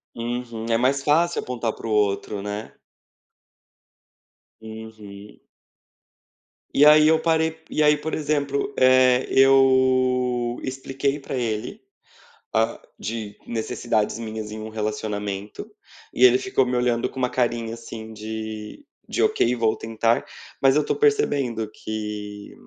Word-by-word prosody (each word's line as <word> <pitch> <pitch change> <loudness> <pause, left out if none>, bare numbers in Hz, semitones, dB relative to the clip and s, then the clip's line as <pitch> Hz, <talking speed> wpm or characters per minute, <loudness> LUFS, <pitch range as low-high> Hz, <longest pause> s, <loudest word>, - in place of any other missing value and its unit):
Uhum. 120 -1 -4
É 115 - +3
mais 135 +3 +1
fácil 170 +4 +2
apontar 120 -3 -3
para - - -8
o - - -4
outro, 105 -1 0
né. 105 +2 -6 1.9
Uhum. 110 -2 -11 1.3
E 145 - +6
aí 150 0 +7
eu 160 - +4
parei 160 0 +1
e 155 - +1
aí 150 0 +5
por 155 +2 -5
exemplo, 140 -2 -1
eh, 130 0 +5
eu 130 -2 +3
expliquei 135 +2 -2
para 135 - -6
ele, 110 -4 -3 0.7
ah, 110 0 0 0.2
de 110 -1 -5
necessidades 115 -2 -1
minhas 110 -2 -6
em 110 - -6
um 110 - -6
relacionamento 105 -2 -4 0.4
e 125 - +1
ele 125 0 +8
ficou 135 -8 +1
me 125 0 -1
olhando 120 -1 +1
com - - -9
uma 125 -1 +1
carinha, 120 -2 -1
assim, 115 -1 -9
de 110 - -7 0.2
de: - - -2
"Ok, 435 - +2
vou 115 -2 +1
tentar", 115 +1 0 0.4
mas 135 -1 +5
eu 150 - +4
estou - - -1
percebendo 140 - +1
que 105 -2 -6
120 Hz, 130 wpm, -23 LUFS, 110-135 Hz, 1.9 s, ele